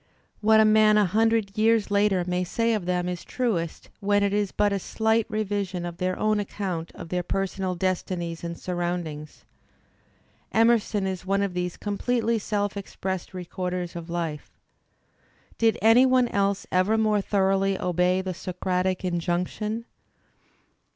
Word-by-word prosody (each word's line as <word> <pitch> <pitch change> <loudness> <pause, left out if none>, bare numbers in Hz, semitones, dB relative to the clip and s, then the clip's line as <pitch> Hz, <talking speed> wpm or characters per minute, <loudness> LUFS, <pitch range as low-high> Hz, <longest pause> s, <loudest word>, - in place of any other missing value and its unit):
What 220 +1 +5
a 220 - +6
man 215 0 +5
a 210 - +5
hundred 220 +1 +1
years 220 -1 +2
later 200 -3 +3
may 180 0 0
say 230 +6 0
of 205 -5 -2
them 180 -1 0
is 180 -1 -4
truest 195 -11 -2
when 205 0 +2
it 200 0 +1
is 205 -2 0
but 205 -1 +1
a 200 - 0
slight 220 +3 0
revision 200 -4 -2
of 170 -1 -6
their 185 0 -1
own 215 0 +1
account 185 -5 -4
of 165 - -9
their 180 0 0
personal 190 0 -2
destinies 175 -2 -2
and 170 0 -4
siuround 175 0 -2
ings. 150 -1 -9 1.1
Emerson 225 -3 +3
is 190 -1 -3
one 195 +1 +1
of 195 -2 -2
these 180 0 -3
completely 230 +2 0
self 205 -1 -2
expressed 190 -2 -4
v/ 185 - -9
recorders 180 -1 -4
of 170 0 -7
life. 165 -3 -4 1.0
Did 225 -1 +3
any 235 +4 +7
one 255 -2 +3
else 200 -1 0
ever 185 +5 +2
more 215 -2 +2
thoroughly 195 -1 +1
obey 180 +1 +1
the 185 -1 -3
Socratic 185 +1 -2
injunction? 180 +6 -2
195 Hz, 155 wpm, -25 LUFS, 180-215 Hz, 1.1 s, any